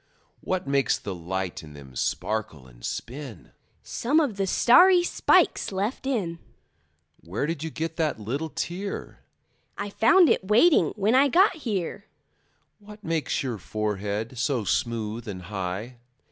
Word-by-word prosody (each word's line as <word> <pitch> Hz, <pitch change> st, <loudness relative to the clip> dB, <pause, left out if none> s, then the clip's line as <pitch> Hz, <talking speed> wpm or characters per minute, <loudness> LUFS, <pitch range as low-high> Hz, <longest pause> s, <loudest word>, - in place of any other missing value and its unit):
What 185 Hz, 0 st, -2 dB
makes 140 Hz, -1 st, +2 dB
the 100 Hz, -, -6 dB
light 90 Hz, +1 st, -4 dB
in 75 Hz, -2 st, -12 dB
them 70 Hz, -3 st, -13 dB
sparkle 105 Hz, -, -2 dB
and -, -, -18 dB
spin? 125 Hz, -, -6 dB, 0.3 s
Some 285 Hz, +7 st, +1 dB
of 280 Hz, -10 st, 0 dB
the 195 Hz, -1 st, -1 dB
starry 355 Hz, -, +6 dB
spikes 350 Hz, -, +2 dB
left 205 Hz, +7 st, -3 dB
in. 185 Hz, -11 st, -2 dB, 0.8 s
Where 90 Hz, +11 st, -3 dB
did 160 Hz, -1 st, -3 dB
you 160 Hz, -, -3 dB
get 160 Hz, +1 st, -4 dB
that 155 Hz, -7 st, 0 dB
little 135 Hz, +10 st, -3 dB
tear? 190 Hz, +6 st, -5 dB, 0.6 s
I 205 Hz, 0 st, -4 dB
found 340 Hz, -, +5 dB
it -, -, +2 dB
waiting 245 Hz, -, +5 dB
when 210 Hz, +2 st, +1 dB
I 270 Hz, +2 st, +6 dB
got 365 Hz, +6 st, +4 dB
here. 205 Hz, -, -3 dB, 0.7 s
What 210 Hz, +1 st, -14 dB
makes 160 Hz, -3 st, -1 dB
your 120 Hz, -5 st, -3 dB
forehead 105 Hz, +3 st, -3 dB
so 125 Hz, -2 st, 0 dB
smooth 115 Hz, +1 st, -2 dB
and 95 Hz, -3 st, -6 dB
high? 95 Hz, +5 st, -5 dB
150 Hz, 145 wpm, -26 LUFS, -, 0.8 s, starry